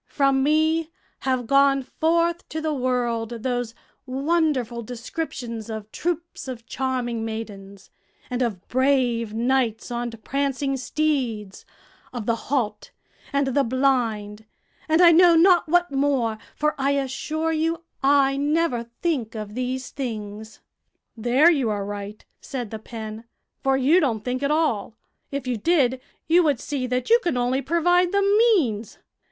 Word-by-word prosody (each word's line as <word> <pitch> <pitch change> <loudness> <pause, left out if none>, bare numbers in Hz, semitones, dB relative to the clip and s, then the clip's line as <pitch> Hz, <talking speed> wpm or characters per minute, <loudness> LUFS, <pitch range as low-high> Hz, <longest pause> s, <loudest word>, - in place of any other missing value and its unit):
From 275 -2 +2
me 315 +3 +2 0.3
have 255 -2 -1
gone 275 +1 +4
forth 335 +5 0
to 315 - -4
the 315 -1 -1
world 240 -3 -1
those 245 -3 -2 0.3
wonderful 270 -4 0
descriptions 235 -1 -6
of 220 -1 -6
troops 340 -3 -4
of 240 -3 -7
charming 250 -4 -2
maidens, 200 -3 -7 0.4
and 250 0 -3
of 210 -7 -2
brave 250 -4 +1
knights 240 -1 0
on 240 0 -2
prancing 275 +4 -2
steeds; 255 -8 -2 0.5
of 240 -4 -5
the 230 - +1
halt 220 -7 -1 0.4
and 280 -1 +1
the 275 +2 +2
blind, 230 -5 0 0.4
and 320 +2 +4
I 340 - +9
know 340 0 +7
not 345 -1 +5
what 350 0 +3
more, 270 -6 0 0.2
for 300 +1 +1
I 275 +1 +2
assure 290 +4 -2
you 325 +1 -1 0.2
I 275 0 +4
never 290 -4 0 0.2
think 265 -11 -1
of 210 -1 -6
these 255 +2 -3
things." 220 -4 -6 0.5
"There 245 +9 +4
you 270 -8 +1
are 205 -2 -2
right," 205 +1 -7
said 245 -5 -6
the 220 - -5
pen, 220 0 -8 0.4
"for 270 0 +2
you 285 +7 +4
don't 230 - 0
think 255 +1 -2
at 280 - 0
all; 295 -9 0 0.3
if 280 -1 -4
you 250 -2 -1
did, 260 -1 +2 0.3
you 340 +2 +5
would 290 -7 +1
see 265 -2 -3
that 250 - -2
you 470 - +7
can 345 - -1
only 250 +2 +1
provide 350 +5 +2
the 400 0 +2
means. 395 - +2
260 Hz, 145 wpm, -24 LUFS, 230-305 Hz, 0.5 s, I